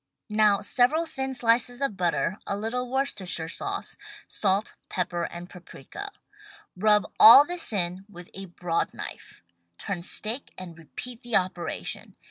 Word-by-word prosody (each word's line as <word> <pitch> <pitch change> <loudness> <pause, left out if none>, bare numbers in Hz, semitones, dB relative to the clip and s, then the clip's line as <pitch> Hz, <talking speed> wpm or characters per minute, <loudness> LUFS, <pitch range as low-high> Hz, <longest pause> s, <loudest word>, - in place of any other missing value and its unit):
Now 210 -2 +4
several 280 +6 +2
thin 265 -4 -4
slices 245 +1 +2
of 275 -7 -1
butter, 180 +1 0
a 200 - -1
little 245 +4 -3
Worcestershire 200 -11 0
sauce, 395 - -4 0.3
salt, 200 +1 +1 0.2
pepper 175 -2 -2
and 175 +1 -8
paprika. 175 -7 -10 0.6
Rub 210 +2 +3
all 235 +6 +11
this 350 -3 -3
in 185 -1 -2
with 180 -3 -12
a 195 0 -7
broad 175 -1 -2
knife. - - -9 0.3
Turn 195 -4 -4
steak 220 +8 -3
and 180 -3 -8
repeat 235 +9 -8
the 240 -2 -2
operation. 180 -2 -2
205 Hz, 135 wpm, -26 LUFS, 180-245 Hz, 0.6 s, all